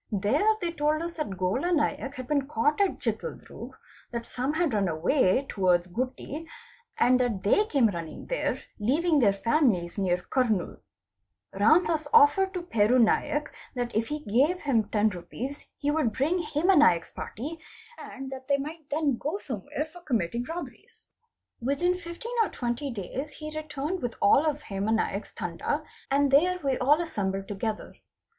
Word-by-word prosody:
There 215 - +2
they 345 - -1
told 305 0 0
us 340 0 -4
that 300 - -4
Gola 210 - 0
Naik 290 -3 0
had 255 - -6
been 280 -2 0
caught 295 - +1
at 395 - +2
Chitaldroog, 480 - -5 0.4
that 235 -1 -4
some 260 +4 -2
had 325 -5 +1
run 200 -2 +2
away 185 - +2
towards 180 -3 +2
Gutti, 255 - -4 0.5
and 250 +1 +4
that 235 -6 0
they 415 - +3
came 275 - +3
running 170 -6 -3
there - - -1 0.2
leaving 300 +8 +2
their 215 -6 +5
families 205 - +1
near 180 -2 +2
Kurnool. 225 -8 0 0.7
Ramdas 310 - +3
offered 415 -4 +6
to 360 - -3
Peru 230 -7 +3
Naik 295 +5 +2 0.3
that 245 -2 -3
if 225 +1 +1
he 300 0 -4
gave 285 - +2
him 240 -7 +2
10 215 0 +3
rupees 220 +10 -7
he 290 0 0
would 295 -8 +1
bring 315 +7 +1
Hema 320 +2 +3
Naik's 175 - +4
party 300 +9 -6 0.4
and 270 0 -8
that 260 -1 -8
they 280 - +3
might 300 +2 -7
then 290 -4 +1
go 310 +10 -2
somewhere 270 - -4
for 335 +3 -14
committing 235 - -1
robberies. 335 +5 -9 0.5
Within 280 +9 +1
15 360 +6 -7
or 440 - +2
20 240 +3 -3
days 260 +7 -5
he 305 +1 -8
returned 310 +3 -3
with 245 -1 -3
all 275 +10 +5
of 300 0 -1
Hema 200 +2 -1
Naik's 225 - -2
Tanda, - - -3 0.3
and 280 0 +2
there 355 +6 +4
we 270 -2 +1
all 290 +5 +4
assembled 195 - -2
together. 210 +2 -4
275 Hz, 165 wpm, -27 LUFS, 220-310 Hz, 0.7 s, offered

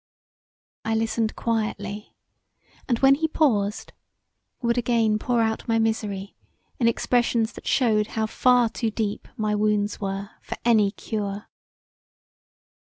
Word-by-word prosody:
I 225 0 0
listened 225 0 0
quietly, 210 -2 -3 0.7
and 240 - +2
when 270 +2 +6
he 315 +3 +1
paused 215 -11 0 0.7
would 235 -2 +1
again 230 -3 +2
pour 235 0 +1
out 220 0 -2
my 230 -1 +2
misery 210 -3 -1 0.4
in 235 - +3
expressions 235 -1 +1
that - - -11
shewed 215 -4 +2
how 220 - +2
far 245 +2 +3
too 225 0 -2
deep 215 -1 -3
my 215 -1 0
wounds 210 0 +1
were 195 +1 -4
for - - -6
any 220 -4 +4
cure. 205 -1 -5
220 Hz, 125 wpm, -24 LUFS, 210-235 Hz, 0.7 s, when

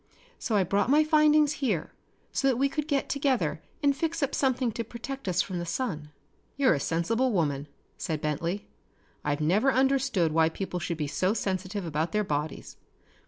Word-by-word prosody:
So 225 - -1
I 200 - +4
brought 200 +5 +1
my 300 +3 +5
findings 305 -1 +4
here 210 - 0 0.4
so 275 - +1
that 260 -3 +3
we 275 +2 +2
could 300 +1 -3
get 285 -3 0
together 280 -3 0 0.2
and 280 -1 +4
fix 325 +1 -1
up 275 - -1
something 255 -3 +1
to 230 - -3
protect 245 +3 -7
us 180 0 +2
from 180 -2 -4
the - - -3
sun." 165 - -3 0.5
"You're 275 -6 +4
a 145 - -1
sensible 225 - 0
woman," 145 -7 0 0.3
said 160 -4 -2
Bentley. 165 +6 -2 0.6
"I've 145 +1 -1
never 200 - +3
understood 265 - +2
why 160 +1 +4
people 180 +1 -4
should 170 -1 -3
be 150 - -1
so 185 +8 0
sensitive 190 -1 -2
about 160 +2 -2
their 210 0 +2
bodies. 150 -4 -4
205 Hz, 180 wpm, -28 LUFS, 165-270 Hz, 0.6 s, my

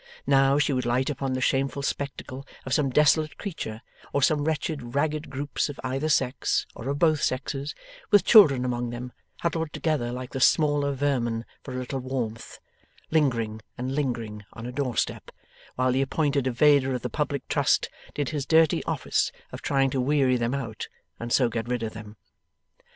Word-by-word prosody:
Now, 135 0 +4
she 150 -1 +2
would 125 -2 -1
light 130 +4 +1
upon 135 -1 -2
the 130 - -2
shameful 135 +2 0
spectacle 140 -1 -4 0.2
of 130 - -2
some 140 -2 +2
desolate 150 +3 +3
creature 115 - -5 0.3
or 140 - +1
some 145 0 +3
wretched 150 -5 -2
ragged 155 +1 0
groups 145 +2 -2
of 145 - -8
either 135 +4 -1
sex, 130 -3 +1
or 120 - -6
of 140 - -1
both 155 -2 +3
sexes, 135 +2 -2 0.3
with 205 -2 +5
children 145 - +7
among 120 -1 -2
them, 125 +1 -6 0.3
huddled 165 -2 -1
together 150 -7 -1
like 125 +1 -6
the 135 - -4
smaller 145 +1 +3
vermin 125 -5 -1 0.2
for 130 - -7
a - - -3
little 130 +1 -3
warmth 125 -3 -4 0.5
lingering 115 -8 +1 0.2
and 130 +2 -3
lingering 115 -7 -2
on 115 - -8
a 125 - -4
doorstep, 125 -3 -2 0.5
while 130 0 +2
the 130 +2 +2
appointed 140 0 0
evader 135 +1 +4
of 125 - -5
the - - 0
public - - -3
trust - - +2 0.3
did 145 -3 -1
his 145 -3 -3
dirty 160 -2 +4
office - - 0 0.2
of - - -8
trying 135 -1 +1
to 130 - 0
weary 135 -1 +3
them 120 +2 0
out 115 -6 -5 0.3
and 120 0 -5
so 125 0 +4
get 115 0 -3
rid 125 -1 -1
of 110 - -4
them. 110 -1 -10
135 Hz, 180 wpm, -26 LUFS, 125-145 Hz, 0.5 s, children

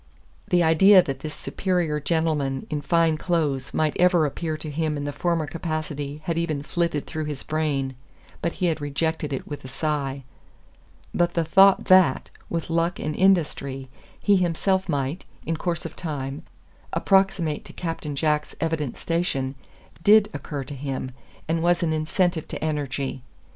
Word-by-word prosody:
The 175 -1 +3
idea 185 +4 +7
that 135 -3 -4
this 150 +1 -6
superior 175 -5 -1
gentleman 150 -3 0
in 150 -1 -1
fine 165 -1 +2
clothes 150 -7 0
might 155 -1 0
ever 180 -3 +5
appear 155 +2 -3
to 155 -1 -6
him 155 0 -1
in 145 - -3
the 145 - -2
former 170 +1 0
capacity 150 -2 -4
had 165 -1 0
even 155 -4 -2
flitted 170 -2 -1
through 155 -1 -4
his 150 -3 -5
brain, 150 -4 -1 0.5
but 170 - -1
he 185 - -2
had 160 -3 0
rejected 150 +1 -1
it 135 - -4
with 145 - -7
a - - -7
sigh. 140 0 -2 0.9
But 175 0 +1
the 170 - +2
thought 195 +4 +6
that, 185 -8 +4 0.2
with 165 -1 -3
luck 170 +2 +1
and 150 0 -3
industry, 145 -8 +1 0.3
he 205 -1 +4
himself 185 +2 +1
might, 145 +3 -1 0.2
in 165 - -1
course 170 +1 -2
of 165 - -6
time, 145 -4 -4 0.5
approximate 190 -6 +2
to - - -10
Captain 165 -4 -4
Jack's 150 +1 0
evident 160 -5 -2
station, 150 -6 -1 0.5
DID 210 +1 +6
occur 145 -3 -5
to 145 - -8
him, 135 -1 -4 0.4
and 165 +1 0
was 175 +1 +2
an 160 -2 +1
incentive 160 +2 0
to - - -5
energy. 140 -3 -2
155 Hz, 160 wpm, -24 LUFS, 145-170 Hz, 0.9 s, idea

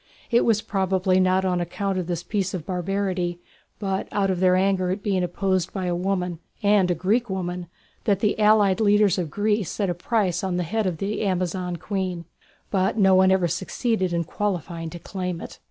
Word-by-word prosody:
It 235 - +4
was 220 -2 +2
probably 190 -1 +1
not 185 0 +3
on 180 -1 +1
account 190 +2 -2
of 175 - -4
this 175 -1 -3
piece 195 -3 -2
of 165 -4 -5
barbarity, 180 -1 -2 0.4
but 195 -2 -2
out 195 -2 +1
of 180 - -2
their 185 0 +4
anger 185 -1 +2
at 195 +2 -3
being 190 -3 +1
opposed 185 0 0
by 190 -2 -3
a 175 -1 0
woman, 180 -2 -1 0.2
and 200 -3 +4
a 175 - +2
Greek 215 +8 +1
woman, 180 -2 -3 0.4
that 200 -3 +2
the 210 +1 0
allied 210 -2 +4
leaders 205 -3 +4
of 170 -4 -2
Greece 205 +1 0
set 200 -4 -1
a - - 0
price 180 -1 0
on 185 -2 -1
the 180 - 0
head 215 +4 -1
of 175 -3 -2
the 200 +5 -2
Amazon 185 -2 -1
queen; 180 -1 -3 0.5
but 190 +2 +1
no 190 -3 +5
one 185 0 +5
ever 190 -2 +3
succeeded 190 +1 -1
in 170 0 0
qualifying 170 -3 -3
to 175 - -8
claim 180 0 -4
it. - - -9
185 Hz, 200 wpm, -24 LUFS, 180-200 Hz, 0.5 s, no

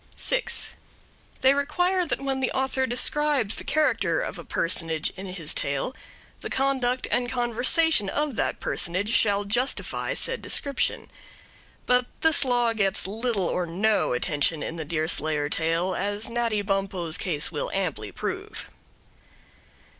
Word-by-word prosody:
6. - - 0 0.7
They 265 +1 +6
require 355 +6 +1
that - - -1
when 270 -1 -2
the 260 - 0
author 265 0 0
describes 260 -2 +2
the - - -6
character 310 +10 +1
of - - -4
a - - -7
personage 165 -2 -1
in 195 +1 -8
his 175 -5 -2
tale, 140 - -2 0.4
the - - -6
conduct 260 -2 0
and 245 0 0
conversation 245 +1 +2
of 295 +2 -1
that - - -1
personage 185 +5 -1
shall 205 -3 +2
justify 240 +6 0
said - - 0
description. 280 -2 0 0.7
But 250 0 +3
this 320 -3 +5
law 245 -3 +2
gets 195 -3 +1
little 215 0 -1
or 175 0 -1
no 205 +3 +1
attention 145 +5 +1
in 165 - -4
the 160 -2 -5
Deerslayer 155 -1 0
tale, 165 +4 +1
as 205 +4 -1
Natty 230 -3 0
Bumppo's 195 -4 -1
case 165 -5 -1
will 150 - -3
amply 155 - -2
prove. - - -5
215 Hz, 140 wpm, -26 LUFS, 170-260 Hz, 0.7 s, They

